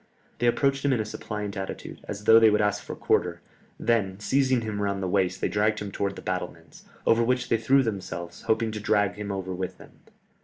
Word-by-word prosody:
They 120 - +2
approached 135 +3 +2
him 140 - +2
in 120 - +1
a 110 - -1
suppliant 105 -1 -5
attitude, 95 -1 -6
as 105 0 -6
though 110 +1 +8
they 110 -1 +7
would 105 - +2
ask 105 0 +1
for - - -6
quarter, - - +1 0.4
then 105 -5 +1
seizing 130 +2 +2
him 105 -2 -3
round 100 -1 -1
the - - 0
waist 95 -1 0
they - - +2
dragged 105 +1 +1
him 105 -2 -5
towards 100 0 -2
the - - -10
battlements, - - -5 0.2
over 115 +1 +4
which 125 +2 0
they 115 - +3
threw 135 +5 +4
themselves, 85 -6 -5
hoping 110 0 +1
to 105 - -5
drag 105 -1 +2
him 105 -1 -5
over 95 -1 -4
with 90 0 -4
them. - - -14
105 Hz, 220 wpm, -26 LUFS, 100-115 Hz, 0.4 s, though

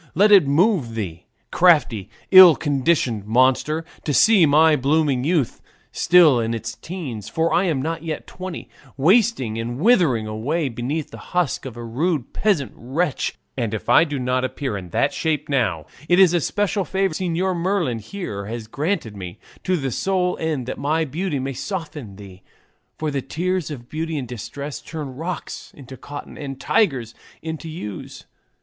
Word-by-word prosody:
Let 205 +5 +5
it 195 -8 +7
move 150 - +2
thee, 90 -6 -5 0.2
crafty, 145 - +3 0.2
ill 185 -4 +10
conditioned 135 -7 0
monster, 130 +7 +2 0.2
to 145 - -1
see 210 -7 +6
my 155 +2 +5
blooming 140 -1 +1
youth 155 -4 0 0.3
still 165 -8 +5
in 115 0 -1
its 115 0 -5
teens, 135 - -7
for 165 +1 0
I 185 - +3
am 150 -7 0
not 165 +1 -3
yet 160 -2 -5
twenty 185 -8 -7 0.3
wasting 155 - +2
and 120 +2 -4
withering 165 - +3
away 135 +9 -2
beneath 130 +6 -4
the - - -10 0.2
husk 175 -6 0
of 120 -2 -9
a 120 - -6
rude 140 +4 -2
peasant 195 - 0
wench; 145 +5 -2 0.2
and 115 -4 -2
if 110 - -7
I - - +7
do 145 -4 -3
not 125 0 0
appear 130 -2 -3
in 90 -3 -7
that - - +1
shape 155 -2 -1
now, 135 -5 0 0.2
it 175 - +5
is 185 -3 +6
a 175 - +2
special 205 +4 0
favour 190 -1 -1
Señor 180 +2 -1
Merlin 170 - 0
here 105 - -6
has 115 0 -5
granted 145 - -3
me, 90 -1 -8 0.3
to 185 0 +1
the 135 -4 -3
sole 185 +4 0
end 155 -6 -2
that 130 - -5
my 155 +3 0
beauty 155 +2 -3
may 135 +1 -3
soften 150 - -6
thee; 95 -2 -12 0.6
for 155 -1 -2
the 140 -1 -2
tears 175 +6 -2
of 125 -5 -8
beauty 160 +2 -3
in 135 - -3
distress 135 +5 -7
turn 150 -5 -7
rocks 165 +4 -6
into 135 -2 -10
cotton 145 +3 -9
and 135 -3 -6
tigers 135 - +1 0.3
into 160 0 -5
ewes. 105 - -8
145 Hz, 170 wpm, -22 LUFS, 120-170 Hz, 0.6 s, ill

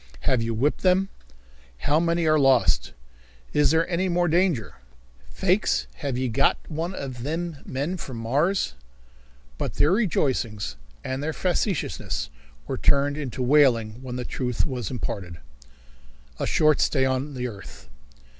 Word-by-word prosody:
"Have 130 -3 +2
you 115 0 -2
whipped 140 +7 +1
them?" 190 +1 +3 0.7
"How 145 - +2
many 170 0 +1
are 155 -1 +4
lost?" 130 - +3 0.6
"Is 145 -2 +4
there 160 +2 +2
any 185 +1 0
more 175 0 +2
danger?" 170 - +1 0.5
"Faix, 190 +2 +1
have 140 -4 -3
ye 130 0 0
got 110 - +2
one 165 +4 -3
of 130 -3 -5
thim 160 +5 -3
men 145 +8 -2
from 130 -7 -7
Mars?" 140 - +1 0.9
But - - -3
their 150 - +3
rejoicings 135 - 0 0.3
and 130 +1 -3
their 155 +2 -2
facetiousness 150 - -1 0.3
were - - -4
turned 140 0 +3
into 135 -3 -4
wailing 125 -5 +3
when 125 -2 -6
the 125 -1 -4
truth 125 -1 -1
was 125 - -4
imparted. 95 -9 -4 1.0
A - - -1
Short 155 -1 +3
Stay 135 -3 +2
on 130 +2 -1
the 125 0 -2
Earth. 100 -5 -11
140 Hz, 145 wpm, -25 LUFS, 125-165 Hz, 1.0 s, are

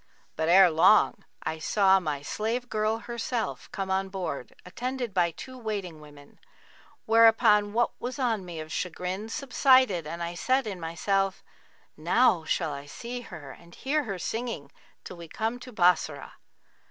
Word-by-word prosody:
But 160 +1 -1
ere 185 0 +7
long 160 +1 +4 0.2
I 160 - -3
saw 195 +3 +4
my 150 -5 -4
slave 230 +9 -3
girl 215 +1 0
herself 235 0 -4
come 195 -1 -4
on 190 0 0
board, 180 -9 -5
attended 245 +3 -4
by 175 -2 +2
two 255 +10 -10
waiting 200 -8 -5
women; 145 -1 -16 0.7
whereupon 220 -2 +5
what 240 +1 +2
was 250 +3 -4
on 230 -7 0
me 175 -3 -7
of 155 0 -8
chagrin 185 +5 -4
subsided 255 - +3
and 170 +2 -5
I 170 0 -4
said 260 +9 +1
in 200 -4 -5
myself, 195 +4 -1 0.5
'Now 170 +1 +2
shall 155 -1 -1
I 140 0 -8
see 240 +10 -6
her 160 - -10
and 170 +4 -15
hear 290 +2 -1
her 195 -4 -4
singing, 220 - -4 0.3
till 180 - -9
we 170 -1 -10
come 225 +6 -3
to 250 +1 -10
Bassorah.' 175 -7 +1
195 Hz, 155 wpm, -27 LUFS, 170-230 Hz, 0.7 s, ere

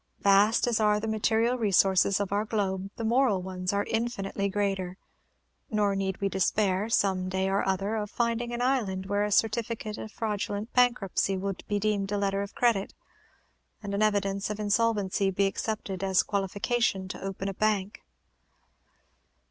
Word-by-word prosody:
Vast 200 +3 +4
as 235 -2 +1
are 210 -1 +3
the 220 - -4
material 225 +3 +1
resources 195 -2 +3
of 200 -2 -2
our 205 +1 +1
globe, 195 -3 -2
the 230 - -5
moral 235 -3 +3
ones 185 -1 -3
are 200 0 0
infinitely 205 -4 -2
greater; 195 -2 -2 0.7
nor 210 -3 +1
need 195 -1 -2
we 200 - 0
despair, 190 +1 +1
some 190 -4 +1
day 190 0 0
or 195 +1 +1
other, 195 +3 -1
of 210 -1 -3
finding 235 +1 -1
an 240 +1 -2
island 210 -8 0
where 205 +1 0
a 210 - -1
certificate 220 0 0
of 220 - -7
fraudulent 210 0 -3
bankruptcy 235 -6 +2
will 195 +1 -2
be 205 - 0
deemed 205 -1 0
a 205 - 0
letter 200 0 0
of 200 0 -6
credit, 230 -5 +1 0.9
and 200 -1 -4
an 200 - -1
evidence 200 -2 +1
of 210 0 -4
insolvency 205 -2 +1
be 195 +1 +1
accepted 195 -1 -3
as 190 -2 +3
qualification 200 0 -1
to - - -7
open 195 0 -4
a 195 - -2
bank. 205 -1 -1
205 Hz, 165 wpm, -28 LUFS, 195-220 Hz, 0.9 s, Vast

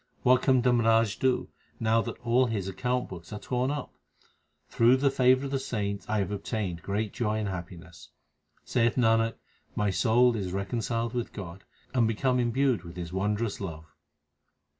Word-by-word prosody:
What 125 0 +5
can 130 -3 +3
Dharmraj 115 -3 +3
do, 130 -1 +1 0.3
now 115 0 +2
that 115 0 -5
all 125 +2 +3
his 105 -5 -2
account 125 +6 -1
books 85 -2 -10
are 105 - -4
torn 125 +3 -1
up? 145 -2 -4 0.7
Through 120 +3 +4
the 140 +1 +2
favour 130 +1 +3
of 135 - -5
the 135 - 0
saints 100 -6 -3
I 110 - +1
have 100 -1 -1
obtained 100 -4 -3
great 105 +1 -2
joy 110 -3 -1
and 110 -1 -2
happiness. 90 -2 -8 0.6
Saith 120 -2 +1
Nanak, 115 -2 +3 0.4
my 105 -1 +1
soul 120 +4 +3
is 95 -4 -3
reconciled 115 +4 -2
with 120 -1 -3
God, 95 -1 -8 0.3
and 120 -3 +3
become 125 +3 +1
imbued 120 -3 +1
with 85 -1 -10
His 85 -1 -6
wondrous 105 +3 -1
love. 80 -5 -7
115 Hz, 165 wpm, -28 LUFS, 100-125 Hz, 0.7 s, What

